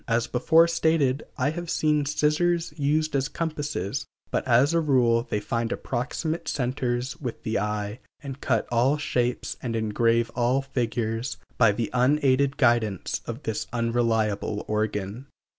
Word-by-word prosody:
As 115 0 +1
before 160 +7 +4
stated, 160 -5 +1
I 135 +3 +1
have 175 +1 -6
seen 150 -3 +1
scissors 155 +3 +1
used 155 +1 0
as 135 0 0
compasses, 145 - -3 0.2
but - - 0
as 130 +6 +4
a 170 - +3
rule 125 -6 +2
they 105 - 0
find 115 +2 -2
approximate 145 +6 -3
centers 125 +2 -2
with 125 -5 -5
the 110 -1 0
eye, 105 +1 -3 0.2
and 140 -1 -8
cut - - 0
all 125 +5 +3
shapes 125 -4 -1
and 120 -3 -3
engrave 115 +1 +1
all 125 +3 +1
figures 120 -1 -2 0.2
by 115 -4 +6
the 115 +1 -3
unaided 135 +1 +3
guidance 120 - +1
of 120 +5 -6
this 110 0 -3
unreliable 115 -3 0
organ. 105 +3 -2
125 Hz, 140 wpm, -26 LUFS, 115-145 Hz, 0.2 s, by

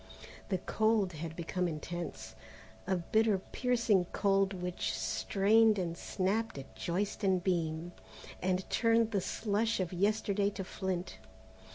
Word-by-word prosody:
The 190 - +1
cold 215 -1 +1
had 160 +1 -6
become 180 +2 -1
intense, 170 +2 -5 0.5
a 190 - +2
bitter 215 +4 +2
piercing 230 -2 +1
cold 195 +1 +2
which 180 -2 -3
strained 215 +2 +3
and 170 -3 -2
snapped 200 +3 -1
at 135 -5 -9
joist 185 - -2
and 185 -2 +2
beam 170 -2 -1 0.5
and 185 0 0
turned 230 -1 +3
the 200 -3 +1
slush 220 +3 0
of 185 -1 -2
yesterday 200 +1 +1
to 195 -1 -5
flint. 185 -1 -4
190 Hz, 130 wpm, -32 LUFS, 175-210 Hz, 0.5 s, strained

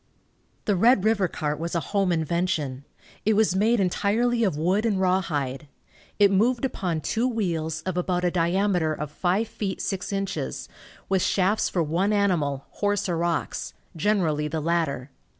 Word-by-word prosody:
The 205 - +2
Red 225 +2 +4
river 215 -4 +3
cart 150 -2 -3
was 170 +1 -3
a - - +3
home 195 -3 +2
invention. 160 -5 -1 0.4
It 220 +1 +3
was 215 -3 +3
made 220 +4 +3
entirely 225 +6 +1
of 190 -9 +1
wood 185 +7 +1
and 210 -4 +1
rawhide. 155 -7 0 0.5
It 200 -1 +5
moved 235 +6 +2
upon 175 -10 -2
two 230 - 0
wheels, 165 -9 -2
of 185 -1 -3
about 180 0 0
a 175 - +2
diameter 175 -2 +1
of 150 -1 -5
five 190 +7 0
feet 195 -3 -4
six 190 -1 -3
inches, 195 - -3 0.4
with 190 -1 +1
shafts 195 +4 +2
for 175 - 0
one 175 +7 +1
animal, 155 -10 +1
horse 205 -1 -1
or 170 -2 -1
ox, 170 -1 -2 0.2
generally 165 -5 +1
the 160 +1 -2
latter. 150 -5 -1
185 Hz, 160 wpm, -25 LUFS, 160-205 Hz, 0.5 s, It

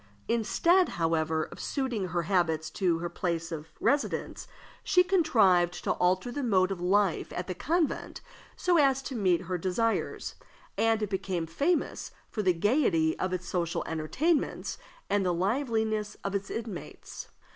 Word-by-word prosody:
Instead, 320 - +3
however, 160 -1 +1
of - - -10
suiting 245 -9 -2
her 175 -1 -1
habits 165 -3 0
to 180 -4 +1
her 170 +1 -3
place 170 -1 -3
of 155 -1 -5
residence, 285 +1 -1 0.4
she 360 - +4
contrived 220 - +3
to - - +1
alter 185 +7 +1
the 285 - -3
mode 195 -6 +2
of 185 -2 -4
life 190 0 +1
at 180 - -3
the 185 - -4
convent 320 - -1 0.4
so 350 -2 +2
as 270 -2 +3
to 270 - -5
meet 185 -7 +2
her 180 0 -3
desires, 220 +6 -1 0.4
and 225 -1 +2
it 210 - -2
became 190 -3 -2
famous 285 - -1 0.2
for 215 - -2
the 185 -3 +3
gayety 170 - +2
of 185 - -1
its 180 -1 -3
social 170 -2 -1
entertainments 270 - -1 0.3
and 205 -1 +1
the 180 - +1
liveliness 220 +2 -1
of 200 - -3
its 200 0 -2
inmates. 220 -6 -7
195 Hz, 155 wpm, -29 LUFS, 175-240 Hz, 0.4 s, she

